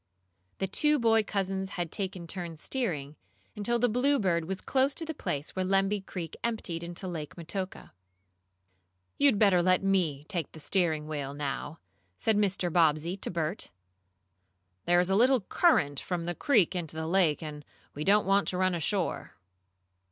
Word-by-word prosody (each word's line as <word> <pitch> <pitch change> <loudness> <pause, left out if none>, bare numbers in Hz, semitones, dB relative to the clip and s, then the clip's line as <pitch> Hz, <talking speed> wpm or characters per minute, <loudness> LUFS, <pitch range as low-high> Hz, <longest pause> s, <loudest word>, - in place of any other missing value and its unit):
The 195 - -1
two 300 +10 +3
boy 225 -3 +4
cousins 195 -2 -2
had 175 -3 -3
taken 190 -3 -4
turns 170 -2 -5
steering, 155 - -2 0.4
until 225 +3 0
the 245 +1 +3
Bluebird 225 - +1
was 190 +3 -3
close 270 +1 +1
to 330 - -1
the 320 - -4
place 145 - -4
where 190 - 0
Lemby 195 +2 +1
Creek 175 -4 -6
emptied 215 -8 -2
into 175 +2 -6
Lake 160 -4 -5
Metoka. 185 +3 -6 1.3
"You'd 280 -6 +5
better 195 -4 +5
let 185 +1 +3
me 170 -8 +1
take 170 -6 -4
the 160 - -10
steering 160 -3 0
wheel, 145 -2 -4
now," 145 +2 -4 0.4
said 220 - +1
Mr. 195 -4 +1
Bobbsey 165 +1 +3
to - - -5
Bert. 170 +2 -2 1.2
"There 175 0 +4
is 180 +1 +1
a - - +3
little 250 +3 +4
current 150 - +2
from 175 -2 -3
the 175 - -2
creek 215 - +2
into 165 -3 -4
the 160 0 -3
lake, 165 -3 +2
and 150 -1 -7 0.3
we 150 - -4
don't 205 +4 +4
want 195 +1 +3
to 180 - 0
run 185 0 +2
ashore." 175 +2 -1
185 Hz, 165 wpm, -29 LUFS, 160-205 Hz, 1.3 s, You'd